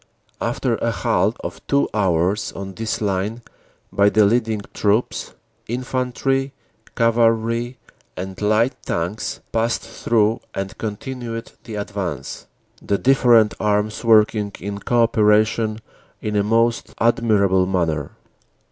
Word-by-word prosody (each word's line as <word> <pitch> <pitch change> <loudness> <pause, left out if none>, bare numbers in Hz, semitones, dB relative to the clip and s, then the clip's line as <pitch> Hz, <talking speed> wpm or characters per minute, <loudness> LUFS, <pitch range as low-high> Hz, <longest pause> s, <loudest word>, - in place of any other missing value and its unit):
"After - - 0
a - - -1
halt - - +1
of - - -6
two 140 0 +2
hours 95 -1 +1
on 95 0 -7
this 115 +2 -3
line 105 +3 -1 0.5
by 100 0 +4
the 105 0 +4
leading 110 0 +1
troops, 105 +3 0 0.3
infantry, 130 +2 -1 0.4
cavalry 115 +1 +2 0.4
and 95 +1 -6
light 110 +5 +2
tanks 90 +6 -3
passed 115 +1 0
through 110 -1 +1 0.2
and 95 0 -4
continued 115 +1 -5
the 115 -3 -7
advance, 100 -9 -5 0.3
the 100 - 0
different 120 -4 +4
arms 105 +1 0
working 105 -2 +4
in 100 +1 -5
co 120 +2 +2
operation 110 0 +2 0.4
in 105 -1 -3
a 105 - +3
most 115 +2 +1
admirable 100 -5 +3
manner. 80 -6 -1
110 Hz, 115 wpm, -21 LUFS, 100-115 Hz, 0.5 s, by